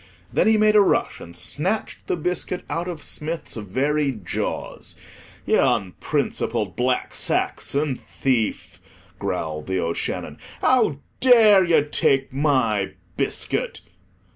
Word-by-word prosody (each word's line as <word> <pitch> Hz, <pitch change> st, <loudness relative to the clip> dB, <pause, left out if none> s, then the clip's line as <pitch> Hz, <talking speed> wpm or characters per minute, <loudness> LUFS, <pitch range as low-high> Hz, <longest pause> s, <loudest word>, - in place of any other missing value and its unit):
Then -, -, +3 dB
he 220 Hz, 0 st, +5 dB
made 215 Hz, 0 st, +4 dB
a 210 Hz, -, +8 dB
rush 200 Hz, -, +1 dB
and 85 Hz, -, -10 dB
snatched 190 Hz, +9 st, -2 dB
the -, -, 0 dB
biscuit 180 Hz, +2 st, -2 dB
out 170 Hz, +2 st, -2 dB
of 170 Hz, -4 st, -5 dB
Smith's 160 Hz, +1 st, -3 dB
very 135 Hz, +8 st, 0 dB
jaws. 100 Hz, -8 st, -4 dB, 0.5 s
"Ye -, -, +3 dB
onprincipled 95 Hz, -2 st, 0 dB
black 125 Hz, +1 st, 0 dB
Saxon 140 Hz, -1 st, 0 dB
thief," 125 Hz, -3 st, -2 dB, 0.4 s
growled 75 Hz, -1 st, -3 dB
The 95 Hz, 0 st, 0 dB
O'Shannon; 85 Hz, -1 st, -3 dB, 0.2 s
"how 220 Hz, -, +2 dB, 0.2 s
dare 220 Hz, -6 st, +7 dB
ye 170 Hz, -4 st, +4 dB
take 135 Hz, -2 st, +1 dB
my 130 Hz, -8 st, +1 dB, 0.2 s
biscuit?" -, -, -1 dB
145 Hz, 115 wpm, -23 LUFS, 115-180 Hz, 0.5 s, a